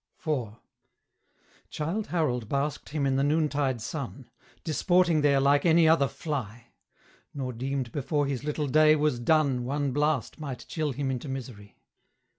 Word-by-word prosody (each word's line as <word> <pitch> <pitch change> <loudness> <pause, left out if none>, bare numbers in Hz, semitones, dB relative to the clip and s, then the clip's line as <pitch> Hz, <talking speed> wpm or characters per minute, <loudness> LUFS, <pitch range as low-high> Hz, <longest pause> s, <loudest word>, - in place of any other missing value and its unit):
IV. 125 -9 -2 1.1
Childe 170 +8 -3
Harold 125 -10 -1
basked 140 +1 -2
him 150 -2 -1
in 135 -1 +1
the 135 - +2
noontide 145 -4 +1
sun, 135 -2 -6 0.3
Disporting 170 0 +2
there 140 -2 +4
like 140 +1 +3
any 165 -1 +5
other 155 -3 +4
fly, 120 -7 -5 0.7
Nor 130 -3 -3
deemed 130 0 -3
before 145 +2 -1
his 135 -2 -3
little 150 0 -2
day 155 +2 +5
was 150 -5 +1
done 140 -1 +2
One 140 +2 -1
blast 145 0 0
might 140 -5 -6
chill 155 -3 -2
him 135 +1 -2
into 130 +2 -4
misery. 120 -6 -8
140 Hz, 145 wpm, -27 LUFS, 130-155 Hz, 1.1 s, any